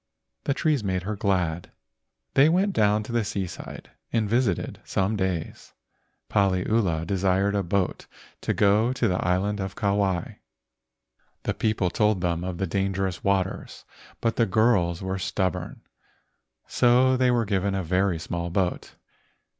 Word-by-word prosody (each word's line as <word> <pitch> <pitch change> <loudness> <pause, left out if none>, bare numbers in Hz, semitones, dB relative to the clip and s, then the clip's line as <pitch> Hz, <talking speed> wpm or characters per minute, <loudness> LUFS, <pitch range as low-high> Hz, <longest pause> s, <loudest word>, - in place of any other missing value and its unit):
The 140 - +1
trees 150 -7 +1
made 95 -2 -1
her 105 +3 -3
glad. 90 -6 -1 0.6
They 140 +3 +6
went 190 +4 +2
down 105 - +2
to 110 - -8
the 120 -1 +1
seaside 95 -3 -6 0.2
and 110 -2 +1
visited 115 -4 0
some 95 +3 0
days. 95 -5 -3 0.5
Paliula 95 -3 +1
desired 95 +2 +1
a 100 - +1
boat 95 +1 -1 0.3
to - - -1
go 105 +5 +3
to 125 -2 +1
the 90 -2 0
island 95 +3 0
of 95 0 -4
Kauai. 100 -4 0 1.1
The - - -1
people 110 -5 0
told 105 -2 +1
them 85 -1 -1
of 90 -1 -4
the 95 - -1
dangerous 95 0 -2
waters, 95 -1 -1 0.4
but 115 -1 0
the 115 - +3
girls 95 -5 +2
were 95 0 -2
stub¬ 95 0 0
born, 90 -1 -8 0.8
so 125 +2 +4
they 130 0 +3
were 120 -2 +2
given 100 -1 0
a 95 - -1
very 90 +1 +1
small 85 +1 -4
boat. 90 0 -2
100 Hz, 145 wpm, -25 LUFS, 90-110 Hz, 1.1 s, They